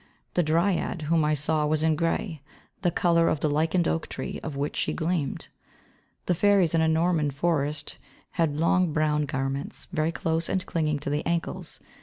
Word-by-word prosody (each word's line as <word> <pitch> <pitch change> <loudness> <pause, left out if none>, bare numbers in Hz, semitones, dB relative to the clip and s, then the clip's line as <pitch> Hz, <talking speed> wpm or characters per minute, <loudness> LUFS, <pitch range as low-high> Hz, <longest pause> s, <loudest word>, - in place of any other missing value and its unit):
The 175 - +3
Dryad 170 +1 +1
whom 160 +1 +2
I 150 0 +2
saw 150 +1 0
was 155 0 +1
in 160 -1 +3
grey, 165 0 -1 0.4
the 175 - +3
colour 170 0 +3
of 155 - 0
the 150 - +1
lichened 160 +3 +1
oak 165 - -1
tree - - -5
out - - -4
of 150 - -5
which 140 +2 -2
she - - 0
gleamed. 160 -4 -2 0.8
The 180 - +2
fairies 190 -2 +3
in 165 - +3
a 160 - +3
Norman 160 -1 +2
forest 145 0 -1 0.3
had 155 -3 0
long 170 0 +2
brown 150 -1 +1
garments, 135 +1 -3
very 155 -1 +1
close 165 0 -1
and 185 -1 -1
clinging, 155 -3 0
to 145 - -3
the 150 +1 0
ankles. 170 0 -3
160 Hz, 185 wpm, -26 LUFS, 150-170 Hz, 0.8 s, The